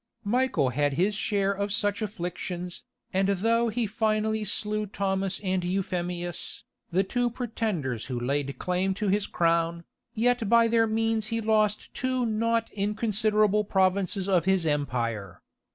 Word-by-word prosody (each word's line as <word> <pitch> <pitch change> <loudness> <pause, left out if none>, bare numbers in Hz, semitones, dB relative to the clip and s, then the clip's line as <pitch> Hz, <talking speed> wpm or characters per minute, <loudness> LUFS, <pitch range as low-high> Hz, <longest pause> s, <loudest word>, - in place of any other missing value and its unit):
Michael 240 - +2
had 145 +3 +1
his 185 +9 +1
share 200 -1 0
of 200 +1 -2
such 205 -1 0
afflictions, 180 -3 -5 0.3
and 190 +1 +2
though 230 +4 +2
he 230 +1 -1
finally 215 0 0
slew 210 0 -1
Thomas 195 -1 -1
and 185 -1 0
Euphemius, 175 -1 -2 0.3
the 185 +3 +3
two 245 +5 0
pretenders 210 - -3
who 125 -3 -3
laid 140 +3 -2
claim 185 +1 0
to 205 0 -1
his 200 +1 +1
crown, 170 0 +1 0.3
yet 240 -1 +1
by 235 0 +6
their 225 0 +3
means 225 0 0
he 230 0 -1
lost 215 -1 +1
two 255 -1 0
not 230 +1 0
inconsiderable 210 0 +1
provinces 190 -1 +1
of 180 -4 +2
his 190 -3 +2
empire. 115 - -2
200 Hz, 140 wpm, -27 LUFS, 180-220 Hz, 0.3 s, by